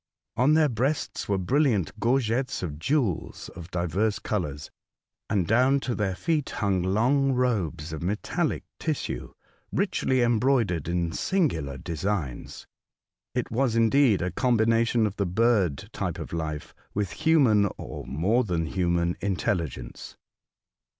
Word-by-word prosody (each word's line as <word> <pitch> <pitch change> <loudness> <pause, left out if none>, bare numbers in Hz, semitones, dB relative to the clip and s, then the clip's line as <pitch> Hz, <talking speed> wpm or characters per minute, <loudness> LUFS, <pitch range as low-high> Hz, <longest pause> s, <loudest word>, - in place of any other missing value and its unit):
On 130 +6 +4
their 155 -1 +5
breasts 135 +2 -2
were 100 - +2
brilliant 110 - +1
gorgets 125 0 0
of 75 -4 -5
jew^els 125 - -1
of 85 -1 -10
divers 90 +5 0
colours, 75 -8 -3 0.6
and 95 -5 +1
down 130 +6 +3
to 125 - -2
their 100 -4 -1
feet 155 - -1
hung 100 -4 0
long 125 +9 +2
robes 90 - -1
of 80 - -5
metallic 105 - -1 0.2
tissue, 155 -3 -3 0.4
richly 130 -2 +1
embroidered 115 - +2
in 85 -1 0
singular 80 - 0
designs. 80 -2 -4 0.7
It - - -2
was 120 0 +1
indeed 115 -2 +4
a 90 - -1
combination 115 +1 +2
of 105 -1 -3
the 100 - 0
bird 95 -6 +1
type - - -3
of - - -7
life 80 -2 -4 0.2
with 100 -4 -1
human, 120 -11 +3
or - - -7
more 95 - +1
than 85 -6 -1
human, 85 0 0
intelligence. 85 -10 -3
105 Hz, 130 wpm, -26 LUFS, 85-125 Hz, 0.7 s, their